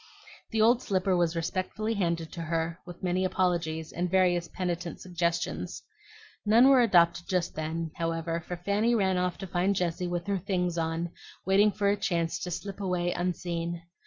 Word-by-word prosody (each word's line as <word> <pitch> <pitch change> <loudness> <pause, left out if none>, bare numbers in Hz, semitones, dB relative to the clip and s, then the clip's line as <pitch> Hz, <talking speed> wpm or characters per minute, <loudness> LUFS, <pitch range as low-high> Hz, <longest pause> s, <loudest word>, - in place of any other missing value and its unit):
The 220 -1 +2
old 235 +2 +5
slipper 190 -3 +1
was 170 -1 +1
respectfully 185 +6 -2
handed 170 -5 -1
to 170 - -6
her 165 +1 -2
with 175 0 -10
many 185 +1 +1
apologies 170 -4 0
and 180 +1 -2
various 175 -2 +3
penitent 175 -2 -3
suggestions. 170 -2 -2 0.6
None 230 +5 +6
were 265 -2 +7
adopted 175 -6 +4
just 180 -2 0
then, 160 +1 -3
however, 165 0 -2
for 180 - -4
Fanny 205 +6 +1
ran 190 -4 +2
off 180 0 0
to 195 - -6
find 185 +2 +1
Jessie 180 0 -1
with 175 0 -3
her 200 -1 0
things 180 -2 -1
on 165 0 -2 0.3
waiting 200 +3 +5
for 200 0 0
a 200 - +4
chance 170 -3 -1
to 180 - -4
slip 195 +3 -5
away 180 -2 0
unseen. 170 -1 -2
175 Hz, 170 wpm, -29 LUFS, 170-190 Hz, 0.6 s, were